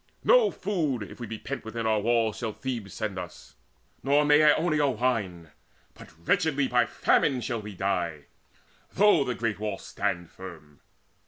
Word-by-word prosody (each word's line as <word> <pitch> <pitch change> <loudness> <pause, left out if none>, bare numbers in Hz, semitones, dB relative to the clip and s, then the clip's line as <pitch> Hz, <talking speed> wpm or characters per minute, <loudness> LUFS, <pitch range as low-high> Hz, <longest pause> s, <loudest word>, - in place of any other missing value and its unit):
No - - +5
food, 155 - -2
if 100 - -11
we 120 - -6
be 110 - -5
pent 140 +5 -6
within 115 +1 -5
our 110 -1 +2
walls, 115 0 +1
Shall 115 -3 -3
Thebe 120 -5 -5
send 100 -2 -4
us, 90 -2 -10 0.5
nor 145 +2 +3
Maeonia 150 0 +4
wine, 95 -10 -2 0.4
But - - -14 0.2
wretchedly 145 -4 +2
by 125 -1 +2
famine 135 -4 +2
shall 120 -2 -3
we 105 -1 -9
die, 85 -6 -2 0.7
Though 205 -6 +5
the 125 -2 -3
great 115 -4 -2
wall 105 -2 -3
stand 85 -1 -3
firm. 80 -6 -12
115 Hz, 155 wpm, -27 LUFS, 100-140 Hz, 0.7 s, No